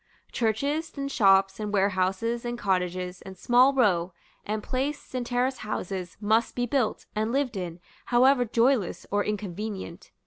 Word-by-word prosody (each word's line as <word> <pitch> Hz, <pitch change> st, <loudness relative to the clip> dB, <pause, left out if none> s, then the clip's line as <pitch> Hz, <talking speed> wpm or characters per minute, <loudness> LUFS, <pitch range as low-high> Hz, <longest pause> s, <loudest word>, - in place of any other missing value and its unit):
Churches, 280 Hz, +8 st, -1 dB
and 275 Hz, 0 st, -3 dB
shops, 195 Hz, -3 st, +4 dB
and 210 Hz, -1 st, -3 dB
warehouses, 195 Hz, +4 st, 0 dB
and 240 Hz, 0 st, -3 dB
cottages, 180 Hz, -3 st, -1 dB
and 190 Hz, -1 st, -10 dB
small 245 Hz, +6 st, +5 dB
row, 190 Hz, -9 st, +2 dB, 0.3 s
and 210 Hz, 0 st, -3 dB
place, 270 Hz, +3 st, -3 dB
and 255 Hz, -1 st, -1 dB
terrace 245 Hz, +2 st, -1 dB
houses, 185 Hz, -4 st, -4 dB
must 220 Hz, +2 st, +1 dB
be 245 Hz, -, 0 dB
built, 245 Hz, -2 st, -1 dB
and 215 Hz, +2 st, 0 dB
lived 265 Hz, -3 st, 0 dB
in, 180 Hz, -2 st, -5 dB, 0.3 s
however 250 Hz, +1 st, +4 dB
joyless 235 Hz, -3 st, +1 dB
or 205 Hz, 0 st, +2 dB
inconvenient. 205 Hz, -3 st, -5 dB
215 Hz, 145 wpm, -27 LUFS, 190-245 Hz, 0.3 s, small